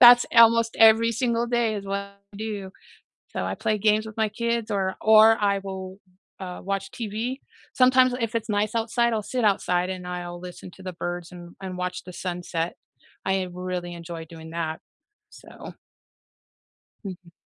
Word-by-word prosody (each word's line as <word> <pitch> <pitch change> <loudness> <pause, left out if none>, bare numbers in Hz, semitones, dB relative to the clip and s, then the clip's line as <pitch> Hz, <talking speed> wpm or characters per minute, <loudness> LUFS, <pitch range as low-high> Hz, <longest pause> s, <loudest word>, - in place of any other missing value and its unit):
That's 245 0 +10
almost 230 0 +6
every 225 +1 +7
single 235 0 0
day 235 -2 +1
is 200 - -5
what 195 0 -1
I 200 0 -14
do. 205 -3 -5 0.6
So, - - -2
I - - -2
play 215 -1 0
games 215 +1 +3
with 220 - -9
my 220 -1 +2
kids 235 +1 -2
or 190 -2 0
or 220 +1 +7
I 200 -1 +2
will, 190 -1 -6 0.4
uh, 180 -1 -6
watch 195 0 -2
TV. 230 +4 -4 0.3
Sometimes 255 0 +5
if 230 0 -2
it's 225 0 -2
nice 215 +2 0
outside, 235 +1 +1
I'll 215 - -1
sit 245 -3 +1
outside 180 -2 0
and 180 -1 -5
I'll 175 -1 -5
listen 180 +1 -10
to 190 - -13
the 185 -1 -5
birds 175 0 -4
and 175 -1 -11
and 185 -1 -5
watch 180 0 -3
the 180 - -9
sunset. 175 -2 -3 0.5
I 190 -1 +1
really 180 -1 -4
enjoy 170 -1 -7
doing 160 0 -11
that, 160 -1 -3 0.5
so - - -15 1.6
Mhm. 180 -3 -8
200 Hz, 170 wpm, -25 LUFS, 180-225 Hz, 1.6 s, That's